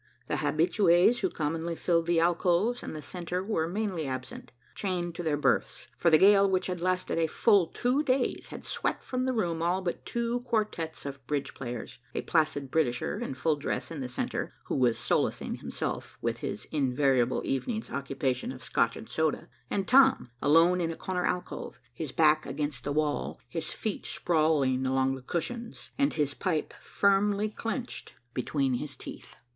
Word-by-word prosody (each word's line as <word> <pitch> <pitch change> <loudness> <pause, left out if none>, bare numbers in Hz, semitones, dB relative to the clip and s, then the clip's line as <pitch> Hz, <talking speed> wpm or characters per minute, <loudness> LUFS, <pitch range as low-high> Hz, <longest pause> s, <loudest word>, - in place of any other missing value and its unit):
The - - 0
habitués 175 +6 +4
who 190 -5 +1
commonly 165 +2 -2
filled 165 0 +1
the 170 -1 +3
alcoves 175 +7 +2
and - - -6
the 155 - -6
centre 180 0 -3
were 190 -6 0
mainly 185 -5 -2
absent, 130 -1 -6 0.2
chained 180 -3 -2
to 170 - -5
their 155 -3 0
berths, 150 - 0
for 170 - +3
the 160 - +7
gale 200 +2 +6
which 185 -1 +1
had 180 -2 -3
lasted 185 -1 0
a 165 - +2
full 200 +2 +4
two 250 - +1
days 260 -3 0
had - - -9
swept - - -2
from 255 0 -2
the 260 - +1
room 175 -9 -1
all 180 +3 +1
but 175 - -3
two 235 +1 -1
quartettes 215 - -2
of 140 -1 -6
bridge 140 -2 -2
players, 120 -2 -6 0.2
a - - -1
placid 155 -5 +1
Britisher 125 -7 0
in 135 - -4
full 150 +4 +1
dress 145 - -3
in 155 -4 -5
the 130 - -3
centre, 125 - -3
who - - -2
was 120 -3 +3
solacing - - 0
himself - - -4
with - - -2
his - - -4
invariable 130 -3 +2
evening's 220 - -2
occupation 135 -2 -2
of 130 -2 -9
Scotch 115 -1 +1
and - - -9
soda, 160 -2 -1 0.2
and 195 -1 -1
Tom, 265 - +5
alone, 170 +4 +5
in 165 - 0
a - - -5
corner 180 0 -2
alcove, 180 -9 -4
his 145 +3 -5
back 155 0 +4
against 140 -3 -3
the 145 - -1
wall, 150 0 -1
his 165 - -3
feet 215 -3 -4
sprawling 150 -6 +2
along 130 0 +2
the 135 - -6
cushions, 230 - -4
and 280 +1 +1
his 145 -2 0
pipe 160 -1 -1
firmly 200 +1 +2
clenched 230 +4 -5 0.2
between 135 +1 0
his 140 +3 -4
teeth. - - -10
165 Hz, 175 wpm, -29 LUFS, 140-195 Hz, 0.2 s, the